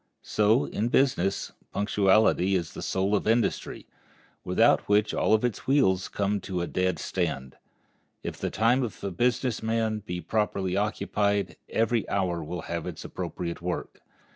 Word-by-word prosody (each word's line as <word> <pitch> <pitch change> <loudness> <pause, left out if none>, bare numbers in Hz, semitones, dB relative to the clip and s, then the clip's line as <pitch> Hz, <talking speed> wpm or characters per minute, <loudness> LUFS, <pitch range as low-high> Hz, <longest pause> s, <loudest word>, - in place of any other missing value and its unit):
So, 110 +4 +3
in 110 - -2
business, 120 -7 +1 0.2
punctuality 100 -1 +3
is 85 -4 -2
the - - -7
soul 95 +2 0
of 105 - -1
industry, 115 +1 0 0.6
without - - +3
which 105 +1 +3
all - - +3
its 120 - -3
wheels 95 -10 +3
come 100 0 -1
to 90 -2 -3
a - - 0
dead 90 -1 0
stand. 75 -6 -3 0.7
If - - -5
the - - -2
time 115 +5 +2
of 120 -5 -5
a 100 - -2
business 120 +5 0
man 110 -1 0
be 90 -4 -5
properly 95 -2 -1
occupied 100 -2 0
every 115 -1 +1
hour 90 -4 0
will 85 +3 -5
have - - -4
its - - -7
appropriate 85 -1 -5
work. 90 0 -4
100 Hz, 150 wpm, -27 LUFS, 90-110 Hz, 0.7 s, So